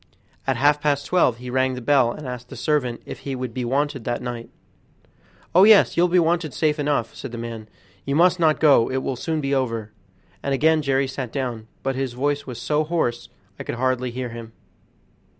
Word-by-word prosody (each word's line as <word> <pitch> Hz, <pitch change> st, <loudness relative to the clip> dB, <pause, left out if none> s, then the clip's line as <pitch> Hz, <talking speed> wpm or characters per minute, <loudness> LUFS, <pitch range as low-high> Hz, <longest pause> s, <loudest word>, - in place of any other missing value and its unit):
At 135 Hz, -2 st, +1 dB
half 145 Hz, +3 st, +3 dB
past 145 Hz, -1 st, +1 dB
twelve 170 Hz, -10 st, +2 dB
he 125 Hz, +1 st, -7 dB
rang 130 Hz, 0 st, +1 dB
the -, -, -5 dB
bell 130 Hz, -1 st, +3 dB
and 145 Hz, +2 st, -8 dB
asked 125 Hz, -1 st, -7 dB
the -, -, -9 dB
servant 125 Hz, -2 st, -1 dB
if -, -, -8 dB
he 135 Hz, -1 st, -5 dB
would 125 Hz, -2 st, -5 dB
be 125 Hz, -, -3 dB
wanted 135 Hz, +1 st, -1 dB
that 120 Hz, +1 st, -2 dB
night. 120 Hz, -2 st, -6 dB, 1.0 s
"Oh, 185 Hz, -, +7 dB
yes, 215 Hz, -1 st, +6 dB
you'll 175 Hz, +1 st, +4 dB
be 180 Hz, +1 st, +2 dB
wanted 165 Hz, -3 st, +1 dB
safe 155 Hz, -1 st, +1 dB
enough," 145 Hz, -5 st, 0 dB
said 135 Hz, -, -8 dB
the 120 Hz, -, -6 dB
man; 115 Hz, -2 st, -7 dB, 0.3 s
"you 140 Hz, -, -2 dB
must 175 Hz, +2 st, +4 dB
not 155 Hz, -2 st, +3 dB
go, 140 Hz, -7 st, +5 dB
it 130 Hz, 0 st, -2 dB
will 135 Hz, -, -2 dB
soon 160 Hz, +5 st, -2 dB
be 140 Hz, 0 st, -1 dB
over," 115 Hz, -5 st, -1 dB, 0.5 s
and 140 Hz, 0 st, 0 dB
again 160 Hz, +3 st, +3 dB
Jerry 135 Hz, -1 st, +1 dB
sat 130 Hz, -3 st, -5 dB
down, 120 Hz, -5 st, -4 dB, 0.2 s
but 135 Hz, -, 0 dB
his 130 Hz, -2 st, -2 dB
voice 145 Hz, +3 st, -1 dB
was 125 Hz, -2 st, -6 dB
so 150 Hz, +5 st, 0 dB
hoarse 150 Hz, -8 st, -2 dB, 0.3 s
I -, -, -4 dB
could -, -, -4 dB
hardly 130 Hz, 0 st, 0 dB
hear 125 Hz, +1 st, -4 dB
him. 115 Hz, -1 st, -9 dB
135 Hz, 210 wpm, -23 LUFS, 120-150 Hz, 1.0 s, Oh